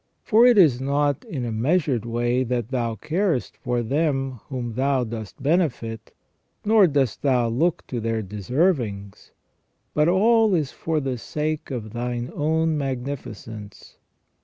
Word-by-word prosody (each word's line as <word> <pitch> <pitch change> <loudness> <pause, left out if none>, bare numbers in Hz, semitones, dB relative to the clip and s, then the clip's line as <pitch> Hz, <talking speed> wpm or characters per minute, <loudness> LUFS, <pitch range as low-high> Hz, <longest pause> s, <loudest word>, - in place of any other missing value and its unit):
For 230 +3 +5
it 245 -3 +5
is 145 -10 +5
not 140 0 0
in 130 -5 -4
a 115 - -3
measured 130 - +1
way 120 +2 0
that 120 -2 -2
Thou 120 -4 -1
carest 165 - -1
for 125 -3 -1
them 135 -1 -1
whom 125 -4 -4
Thou 135 +1 +1
dost 110 -3 -7
benefit, 125 -9 0 0.5
nor 210 -2 +6
dost 140 -7 0
Thou 125 -4 +2
look 155 +9 0
to 120 - -4
their 115 -1 -1
deservings, 105 - -1 0.6
but 150 +1 +3
all 215 +3 +4
is 150 -5 -1
for 160 -1 -2
the 135 -4 -3
sake 155 +4 -3
of 115 -5 -5
Thine 120 +1 -3
own 160 +1 +1
magnifi 135 -3 -4
cence. 105 -2 -11
130 Hz, 145 wpm, -24 LUFS, 115-155 Hz, 0.6 s, nor